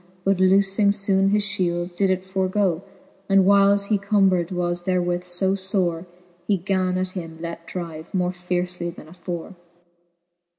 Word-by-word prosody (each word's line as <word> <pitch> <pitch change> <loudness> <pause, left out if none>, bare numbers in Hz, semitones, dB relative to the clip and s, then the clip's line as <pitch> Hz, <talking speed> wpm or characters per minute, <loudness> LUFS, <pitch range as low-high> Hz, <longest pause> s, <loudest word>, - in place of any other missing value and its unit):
But 195 -1 +1
loofing 195 +2 +3
foone 195 -1 +2
his 210 +1 +2
fhield, 175 -2 -2
did 195 +1 +2
it 185 0 0
forgoe 190 -2 0 0.2
\ 195 - -33
And 195 -1 +5
whiles 200 0 +5
he 210 -2 +2
combred 195 -3 +2
was 175 -1 -2
therewith 180 -1 0
fb 180 +2 0
fbre^ 185 -3 -1 0.4
He 205 - +2
gan 185 0 0
at 185 0 -1
him 165 -3 -7
let 170 0 -7
drive 165 -3 -7
more 180 -1 0
fiercely 180 -1 -2
then 170 -2 -11
afore. 175 +2 -7
185 Hz, 155 wpm, -23 LUFS, 175-195 Hz, 0.4 s, And